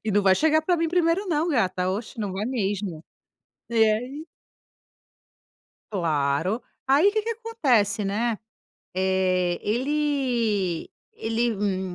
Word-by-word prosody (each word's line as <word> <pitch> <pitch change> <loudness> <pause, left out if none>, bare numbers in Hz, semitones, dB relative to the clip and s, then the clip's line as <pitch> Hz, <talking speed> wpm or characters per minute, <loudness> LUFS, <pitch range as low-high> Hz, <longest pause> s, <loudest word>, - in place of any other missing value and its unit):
e 220 - 0
não 205 0 +3
vai 190 -1 +5
chegar 315 +5 +3
pra 355 +2 +2
mim 330 0 0
1º, 350 +3 +1
não, 320 +1 +1
gata. 185 - +1
Oxe, 215 +4 -5
não 205 -4 -2
vai 195 +2 -3
mesmo. 200 -8 -2 0.6
E 235 - -6
e 220 -1 +5
aí 255 +8 -4 1.7
Claro. 165 - 0 0.2
Aí 285 +9 +5
que 435 +1 0
que 455 - -3
acontece, 270 - +1
né. 215 +3 -1 0.6
Eh, 185 -1 +1
ele 240 - 0 0.2
ele, 230 +1 -1
hum 190 -2 -2
220 Hz, 130 wpm, -25 LUFS, 190-295 Hz, 1.7 s, vai